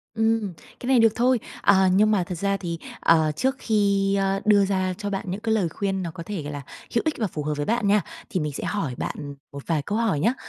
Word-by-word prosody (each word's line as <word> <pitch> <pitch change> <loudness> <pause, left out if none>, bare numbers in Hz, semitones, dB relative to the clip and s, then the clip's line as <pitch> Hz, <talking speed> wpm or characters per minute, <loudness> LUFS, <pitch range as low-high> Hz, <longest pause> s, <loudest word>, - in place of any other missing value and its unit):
Ừm, 220 -4 +1 0.3
cái 250 - -6
này 260 -3 +5
được 225 -1 +4
thôi. 245 0 +3 0.2
À, 190 -1 +5
nhưng 215 +2 +4
mà 195 -4 +2
thật 175 +1 -5
ra 200 +2 0
thì, 170 -3 -4 0.2
ờ, 160 -2 +4
trước 265 - 0
khi, 200 -2 +2
ơ, 195 0 +1
đưa 205 -2 +5
ra 185 -1 0
cho 205 -1 -4
bạn 195 -1 -3
những 195 +3 -4
cái 225 -1 +1
lời 180 -6 +1
khuyên 195 +2 -2
nó 170 - -4
có 170 - -8
thể 195 -3 -4
gọi 150 0 -5
là 145 - -5 0.3
hữu 230 - +4
ích 315 - +1
và 220 -4 0
phù 150 -3 -5
hợp 150 0 -1
với 145 - -1
bạn 230 -2 +1
nha, 205 0 +4 0.3
thì 185 -6 -1
mình 150 -2 -2
sẽ - - -5
hỏi 170 -12 -2
bạn 145 -1 -5 0.2
một 140 0 -8
vài 160 -3 +1
câu 205 +8 -2
hỏi 220 -11 +1
nhá. 230 - +2
195 Hz, 265 wpm, -24 LUFS, 170-215 Hz, 0.3 s, này